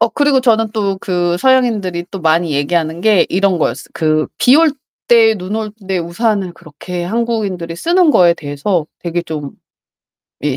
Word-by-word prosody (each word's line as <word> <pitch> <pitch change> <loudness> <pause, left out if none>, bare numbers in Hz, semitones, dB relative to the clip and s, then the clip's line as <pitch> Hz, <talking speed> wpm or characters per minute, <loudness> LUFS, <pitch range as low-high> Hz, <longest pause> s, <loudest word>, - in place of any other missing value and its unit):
어 230 - +3
그리고 285 +1 +2
저는 225 -3 +2
또 200 -3 -1
그 175 -2 -1
서양인들이 215 -9 +1
또 195 - -6
많이 160 0 +1
얘기하는 160 +3 -1
게 210 -1 +3
이런 190 -1 +1
거였어요. - - -2
그 155 -1 +1
비 255 +4 +5
올 325 -1 +4 0.4
때 225 -2 +5
눈 190 +3 -5
올 215 -2 -4 0.2
때 190 - 0
우산을 185 +2 -1
그렇게 175 +2 -8
한국인들이 200 -5 -2
쓰는 340 - +2
거에 175 -6 +4
대해서 150 +3 -2
되게 175 0 -3
좀 150 -4 -6 0.9
예 145 -3 -1
185 Hz, 320 characters per minute, -15 LUFS, 170-225 Hz, 0.9 s, 비